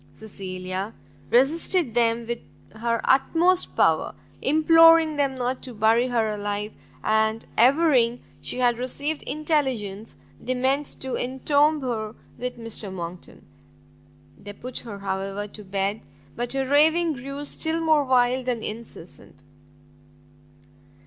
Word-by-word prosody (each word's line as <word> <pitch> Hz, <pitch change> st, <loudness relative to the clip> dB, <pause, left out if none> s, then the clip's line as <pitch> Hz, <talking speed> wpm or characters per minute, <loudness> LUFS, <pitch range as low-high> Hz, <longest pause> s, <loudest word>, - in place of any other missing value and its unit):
Cecilia 185 Hz, 0 st, -6 dB, 0.3 s
resisted 280 Hz, -, +2 dB
them 230 Hz, -1 st, +2 dB
with 235 Hz, +1 st, -3 dB, 0.3 s
her 230 Hz, +1 st, -1 dB
utmost 340 Hz, +7 st, +2 dB
power, -, -, +2 dB, 0.3 s
imploring 325 Hz, +1 st, +5 dB
them 275 Hz, -2 st, +1 dB
not 255 Hz, 0 st, -2 dB
to 250 Hz, -3 st, -6 dB
bury 225 Hz, +3 st, +3 dB
her 235 Hz, -3 st, +1 dB
alive, 205 Hz, 0 st, -3 dB, 0.3 s
and 220 Hz, +1 st, +1 dB
averring 250 Hz, -2 st, +3 dB, 0.2 s
she -, -, -4 dB
had 240 Hz, -2 st, +2 dB
received 285 Hz, +5 st, -3 dB
intelligence 260 Hz, -10 st, -2 dB, 0.2 s
they 255 Hz, +1 st, -2 dB
meant 270 Hz, +3 st, +1 dB
to 265 Hz, -1 st, -4 dB
entomb 285 Hz, +4 st, +1 dB
her 225 Hz, -4 st, -3 dB, 0.2 s
with 250 Hz, 0 st, -4 dB
Mr 225 Hz, -3 st, -5 dB
Monckton. 175 Hz, -1 st, -8 dB, 0.9 s
They 205 Hz, -, -9 dB
put 250 Hz, +4 st, -4 dB
her, 220 Hz, -4 st, -8 dB
however, 195 Hz, +1 st, -4 dB
to 210 Hz, -, -10 dB
bed, 195 Hz, +2 st, -2 dB, 0.3 s
but 240 Hz, +1 st, -2 dB
her 270 Hz, -1 st, -1 dB
raving 315 Hz, +4 st, +4 dB
grew 275 Hz, +2 st, -7 dB
still 320 Hz, +2 st, 0 dB
more 315 Hz, -2 st, +3 dB
wild 255 Hz, -1 st, +2 dB
and 240 Hz, -3 st, -1 dB
incessant. 210 Hz, -9 st, -9 dB
245 Hz, 120 wpm, -24 LUFS, 215-285 Hz, 0.9 s, imploring